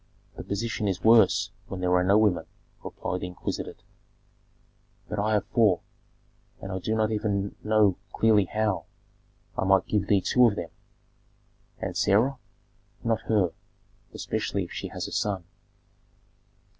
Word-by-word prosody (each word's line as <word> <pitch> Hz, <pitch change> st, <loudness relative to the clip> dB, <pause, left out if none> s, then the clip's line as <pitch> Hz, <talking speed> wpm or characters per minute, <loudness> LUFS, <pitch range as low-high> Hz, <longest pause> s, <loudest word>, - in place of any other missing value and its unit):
"The -, -, -7 dB
position 105 Hz, +1 st, -2 dB
is 95 Hz, -2 st, -2 dB
worse 100 Hz, -4 st, +5 dB, 0.2 s
when 95 Hz, -, -6 dB
there 90 Hz, 0 st, +1 dB
are 90 Hz, 0 st, +4 dB
no 100 Hz, +3 st, +4 dB
women," 105 Hz, -5 st, +2 dB, 0.4 s
replied 90 Hz, -, -4 dB
the 90 Hz, -, -4 dB
exquisite. 90 Hz, -, -6 dB, 1.2 s
"But 105 Hz, -, -4 dB
I 110 Hz, +2 st, +1 dB
have 105 Hz, -2 st, +1 dB
four, 110 Hz, -6 st, +3 dB, 0.8 s
and 95 Hz, -, -7 dB
I 95 Hz, -, -3 dB
do 110 Hz, +4 st, -1 dB
not 110 Hz, 0 st, +1 dB
even 105 Hz, -2 st, -1 dB
know 105 Hz, -3 st, +3 dB
clearly 110 Hz, -3 st, +3 dB
how. 105 Hz, 0 st, -1 dB, 0.7 s
I -, -, -1 dB
might 95 Hz, 0 st, +4 dB
give 105 Hz, -2 st, 0 dB
thee 100 Hz, -, +4 dB
two 125 Hz, +5 st, +4 dB
of 105 Hz, -, 0 dB
them." 85 Hz, -, -5 dB, 1.1 s
"And -, -, -4 dB
Sarah?" 120 Hz, +7 st, +2 dB, 0.6 s
"Not 115 Hz, -2 st, 0 dB
her, 100 Hz, -6 st, +3 dB, 0.6 s
especially -, -, -2 dB
if -, -, -9 dB
she -, -, -5 dB
has -, -, -5 dB
a -, -, -9 dB
son." 100 Hz, -4 st, -1 dB
105 Hz, 145 wpm, -27 LUFS, 95-110 Hz, 1.2 s, worse